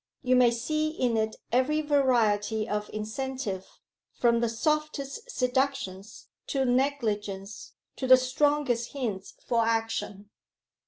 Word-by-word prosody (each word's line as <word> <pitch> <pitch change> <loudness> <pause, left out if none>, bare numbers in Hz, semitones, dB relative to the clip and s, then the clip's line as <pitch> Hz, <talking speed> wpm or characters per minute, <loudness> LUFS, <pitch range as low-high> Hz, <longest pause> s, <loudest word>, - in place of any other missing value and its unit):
You 255 0 +3
may 250 -1 +6
see 305 +7 -1
in 250 -7 0
it 220 0 0 0.2
every 260 +6 +2
variety 230 -7 +2
of 210 0 -2
incentive 215 -2 -4 0.5
from 235 -1 +2
the 235 -1 +1
softest 305 - -2
seductions 250 - -2 0.2
to 270 -3 0
negligence 215 -7 -1 0.2
to 260 - -2
the 255 0 +9
strongest 255 -1 0
hints 220 -9 -4
for 230 -1 +2
action. 225 -3 -2
245 Hz, 115 wpm, -28 LUFS, 220-275 Hz, 0.5 s, the